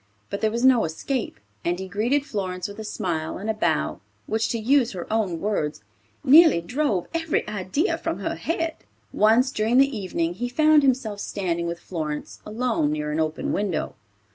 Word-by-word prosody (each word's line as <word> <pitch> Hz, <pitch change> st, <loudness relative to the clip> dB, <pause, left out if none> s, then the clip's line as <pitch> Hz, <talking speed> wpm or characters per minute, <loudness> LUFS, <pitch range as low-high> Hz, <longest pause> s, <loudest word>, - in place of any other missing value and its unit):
But 200 Hz, -, -3 dB
there 220 Hz, -, +3 dB
was 235 Hz, +3 st, 0 dB
no 255 Hz, -3 st, +6 dB
escape, 165 Hz, -, -3 dB, 0.2 s
and 175 Hz, +1 st, 0 dB
he 190 Hz, +1 st, -6 dB
greeted 235 Hz, +9 st, 0 dB
Florence 185 Hz, -6 st, -3 dB
with 205 Hz, +1 st, -10 dB
a -, -, -4 dB
smile 165 Hz, -6 st, -3 dB
and 210 Hz, +4 st, -2 dB
a -, -, -2 dB
bow, 75 Hz, -, 0 dB, 0.2 s
which, 220 Hz, -, 0 dB
to 235 Hz, -, -1 dB
use 245 Hz, +1 st, +2 dB
her 180 Hz, -2 st, -5 dB
own 195 Hz, -7 st, 0 dB
words, 175 Hz, -6 st, -2 dB, 0.4 s
"nearly 300 Hz, -, +7 dB
drove 205 Hz, -, -1 dB
every 325 Hz, -7 st, 0 dB
idea 210 Hz, -, -1 dB
from -, -, -2 dB
her -, -, -3 dB
head." 330 Hz, -1 st, -2 dB, 0.4 s
Once 230 Hz, +5 st, +4 dB
during 225 Hz, 0 st, +1 dB
the 275 Hz, -1 st, +4 dB
evening 175 Hz, -4 st, -2 dB
he 245 Hz, +7 st, -3 dB
found 305 Hz, +3 st, +5 dB
himself 250 Hz, -6 st, +1 dB
standing 170 Hz, -4 st, -2 dB
with 170 Hz, 0 st, -4 dB
Florence, 155 Hz, -4 st, -5 dB
alone, 220 Hz, -8 st, 0 dB
near 150 Hz, 0 st, -2 dB
an 155 Hz, -, -1 dB
open 155 Hz, 0 st, -1 dB
window. 195 Hz, -5 st, -1 dB
215 Hz, 180 wpm, -24 LUFS, 175-255 Hz, 0.4 s, nearly